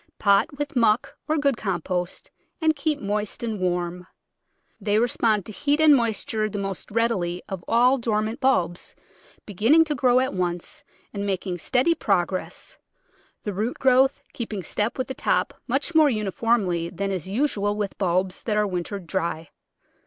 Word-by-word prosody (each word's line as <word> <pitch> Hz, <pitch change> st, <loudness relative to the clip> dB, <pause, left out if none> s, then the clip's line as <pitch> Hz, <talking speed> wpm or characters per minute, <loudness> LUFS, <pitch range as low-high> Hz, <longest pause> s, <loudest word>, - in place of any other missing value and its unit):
Pot 200 Hz, +7 st, +3 dB
with 290 Hz, +1 st, -4 dB
muck 230 Hz, -1 st, +2 dB
or 310 Hz, -, +1 dB
good 280 Hz, -4 st, +1 dB
compost 180 Hz, -2 st, -3 dB, 0.3 s
and 315 Hz, -2 st, +2 dB
keep 295 Hz, 0 st, -1 dB
moist 210 Hz, +2 st, -2 dB
and 220 Hz, -3 st, -2 dB
warm. 180 Hz, 0 st, -2 dB, 0.7 s
They 205 Hz, 0 st, +1 dB
respond 220 Hz, -3 st, +2 dB
to -, -, -7 dB
heat 290 Hz, +7 st, 0 dB
and 310 Hz, -2 st, +7 dB
moist 230 Hz, -5 st, 0 dB
ure 215 Hz, -1 st, 0 dB
the 205 Hz, -, -5 dB
most 195 Hz, -1 st, -4 dB
readily 200 Hz, -6 st, 0 dB
of 190 Hz, -3 st, -6 dB
all 250 Hz, +3 st, +4 dB
dormant 220 Hz, +1 st, -1 dB
bulbs, 180 Hz, -, 0 dB, 0.5 s
beginning 225 Hz, -, +4 dB
to 310 Hz, -2 st, -2 dB
grow 250 Hz, -2 st, +3 dB
at 260 Hz, 0 st, 0 dB
once 180 Hz, -, -2 dB, 0.3 s
and 200 Hz, -1 st, -3 dB
making 185 Hz, -2 st, -2 dB
steady 260 Hz, -, +2 dB
progress, 190 Hz, -, -2 dB, 0.6 s
the 205 Hz, -, -3 dB
root 215 Hz, +6 st, -2 dB
growth 265 Hz, +2 st, +3 dB
keeping 215 Hz, -5 st, -4 dB
step 210 Hz, +7 st, -2 dB
with 255 Hz, -, -1 dB
the 265 Hz, -, -4 dB
top -, -, 0 dB
much 275 Hz, +7 st, -1 dB
more 315 Hz, -2 st, +6 dB
uniformly 205 Hz, -5 st, 0 dB
than 195 Hz, +3 st, -3 dB
is 185 Hz, -1 st, -4 dB
usual 205 Hz, -3 st, 0 dB
with 205 Hz, -2 st, -3 dB
bulbs 185 Hz, 0 st, 0 dB
that 215 Hz, -2 st, -1 dB
are 210 Hz, -, +3 dB
wintered 185 Hz, 0 st, -4 dB
dry. 165 Hz, -2 st, -3 dB
210 Hz, 160 wpm, -24 LUFS, 185-255 Hz, 0.7 s, and